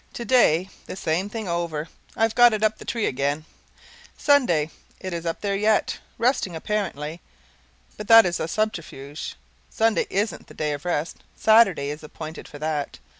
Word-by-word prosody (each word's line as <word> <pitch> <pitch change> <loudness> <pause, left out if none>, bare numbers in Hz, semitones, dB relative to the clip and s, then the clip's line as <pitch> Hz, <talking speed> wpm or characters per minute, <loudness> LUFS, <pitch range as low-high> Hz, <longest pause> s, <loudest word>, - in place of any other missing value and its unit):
Today 235 -8 +3 0.2
the - - -6
same 185 +2 -1
thing 220 -1 -5
over. 170 -3 -2 0.3
I've 225 0 +2
got 240 -1 +6
it 215 0 -1
up 215 0 +1
the - - -10
tree 230 -3 -1
again. 140 +3 -1 0.7
SUNDAY. 175 - +3 0.3
It 185 -1 -5
is 170 0 -4
up 165 - -3
there 200 -1 0
yet. 210 +2 +1 0.2
Resting, 230 -7 +1
apparently. 165 -4 -3 0.8
But 210 - -7
that 225 -1 +9
is 175 -1 -1
a 160 - -2
subterfuge: 165 -8 -4 0.3
Sunday 225 -1 +1
isn't 205 +3 -2
the - - -14
day 150 -1 -1
of 145 +2 -7
rest; 170 -2 -1 0.2
Saturday 195 -11 +4
is 150 - -7
appointed 155 +1 -8
for 145 - -10
that. 150 -1 -3
175 Hz, 165 wpm, -24 LUFS, 155-215 Hz, 0.8 s, that